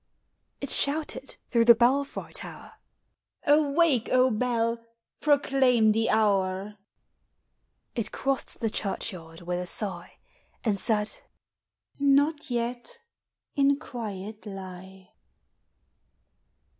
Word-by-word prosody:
" - - -49
It 280 - -3
shouted 285 -1 +2
through 235 -2 +2
the 235 0 +8
belfry 270 +5 0
tower, - - -5 0.4
" - - -38
Awake, 295 -3 +3
O 255 0 +4
bell! 230 0 -1 0.4
proclaim 265 -6 +3
the 225 +1 +1
hour." 200 -1 0 1.1
It 230 -3 -3
crossed 270 -2 -1
the 225 -2 0
churchyard 180 -6 -3
with 175 +1 -3
a 180 - -5
sigh, 185 -3 -2 0.5
And 205 -4 0
said, 210 -1 +2 0.8
''Not 285 +2 +2
yet! 240 - -4 0.6
in 280 0 +3
quiet 215 -6 -7
lie." 190 -1 -10
230 Hz, 100 wpm, -27 LUFS, 200-275 Hz, 1.1 s, the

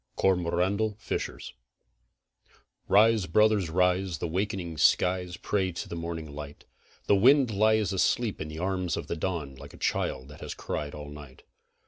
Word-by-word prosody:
COROMANDEL 95 +3 +1
FISHERS 110 - -5 1.3
Rise, 110 -1 +4
brothers, 105 0 +3
rise, 90 +1 +1
the 80 - -4
wakening 90 -1 -2
skies 90 +1 +2
pray 95 -1 -1
to 85 - -5
the - - -6
morning 85 -2 -5
light, 75 0 -9 0.4
The 100 - +4
wind 130 +4 +5
lies 110 0 +2
asleep 110 +3 +1
in 80 - -4
the 75 0 -8
arms 90 0 -1
of - - -4
the - - -3
dawn 80 -5 -3
like 65 - -12
a - - -14
child 65 0 -1
that 75 - -13
has - - -6
cried 75 0 -4
all 75 -1 -8
night. 75 -3 -12
90 Hz, 155 wpm, -28 LUFS, 80-100 Hz, 1.3 s, wind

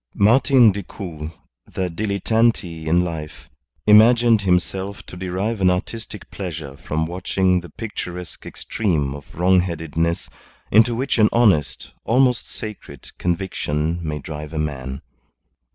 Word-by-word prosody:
Martin 120 +2 +5
Decoud, 90 -5 -7 0.4
the 95 - -1
dilettante 100 -2 0
in 85 +3 +3
life, 80 -3 -6 0.4
imagined 115 +1 +6
himself 95 +1 -1
to - - -11
derive 95 +4 -2
an 95 - +5
artistic 105 +3 -4
pleasure 80 -8 -6
from 80 +3 -2
watching 90 +1 +1
the 90 - -11
picturesque 90 -2 -7
extreme 80 -11 -1
of 70 0 -11
wrongheadedness 85 -2 +1 0.4
into 115 +3 +5
which 130 0 -1
an 110 - +6
honest, 100 -11 +2
almost 125 +1 +2
sacred, 100 - -8
conviction 85 -3 -1
may 75 -2 -3
drive 75 +1 -7
a - - -4
man. 70 -3 -4
90 Hz, 120 wpm, -21 LUFS, 80-105 Hz, 0.4 s, imagined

